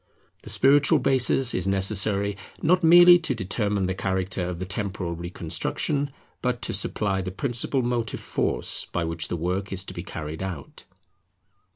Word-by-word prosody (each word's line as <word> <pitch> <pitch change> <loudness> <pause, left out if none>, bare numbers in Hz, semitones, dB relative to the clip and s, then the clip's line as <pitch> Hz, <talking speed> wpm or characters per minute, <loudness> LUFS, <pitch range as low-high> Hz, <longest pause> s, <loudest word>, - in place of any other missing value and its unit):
The - - -11
spiritual 145 +2 +4
basis 130 -1 +3
is 95 +1 0
necessary 100 +1 +1 0.2
not 180 +3 +2
merely 175 +1 +8
to 150 -6 -2
determine 100 -1 -1
the 95 - -1
character 95 0 -2
of 90 - -5
the 90 - -5
temporal 100 -3 -3
reconstruction, 85 - -2 0.3
but 125 -1 -1
to - - -2
supply 100 -1 -1
the 95 - -4
principal 120 +5 0
motive 120 -2 -2
force - - -1
by 90 - -1
which 80 0 0
the 85 - -3
work 90 +4 -3
is 95 -1 -1
to - - -9
be 85 - -6
carried 80 -2 -7
out. 90 -8 -7
100 Hz, 160 wpm, -25 LUFS, 90-125 Hz, 0.3 s, merely